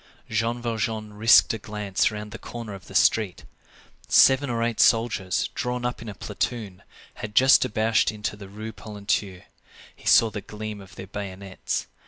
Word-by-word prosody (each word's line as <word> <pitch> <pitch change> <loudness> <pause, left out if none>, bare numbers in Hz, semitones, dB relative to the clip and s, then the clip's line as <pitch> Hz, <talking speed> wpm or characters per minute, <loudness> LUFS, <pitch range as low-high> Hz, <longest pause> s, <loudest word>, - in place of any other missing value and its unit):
Jean 115 +2 -1
Valjean 110 -2 -3
risked 110 +3 +5
a 110 - -4
glance 105 -2 -1
round 105 0 -7
the 115 - -8
corner 115 -3 -7
of 95 - -11
the - - -11
street. 105 -5 +2 0.6
Seven 135 +1 +5
or 115 -1 -1
eight 115 -1 -2
soldiers, 110 -5 +2
drawn 125 0 -3
up 125 -3 -3
in 115 - -7
a 100 - -8
platoon, 100 -3 -4 0.4
had 105 -1 -6
just 130 +1 +7
debouched 110 +1 +2
into 105 -1 -4
the 100 -2 -11
Rue 110 +3 -7
Polonceau. 100 -3 -3 0.5
He - - -12
saw 115 -1 +6
the 105 - -5
gleam 105 0 -7
of 95 - -15
their 95 - -8
bayonets. 95 -1 -5
110 Hz, 170 wpm, -25 LUFS, 100-115 Hz, 0.6 s, just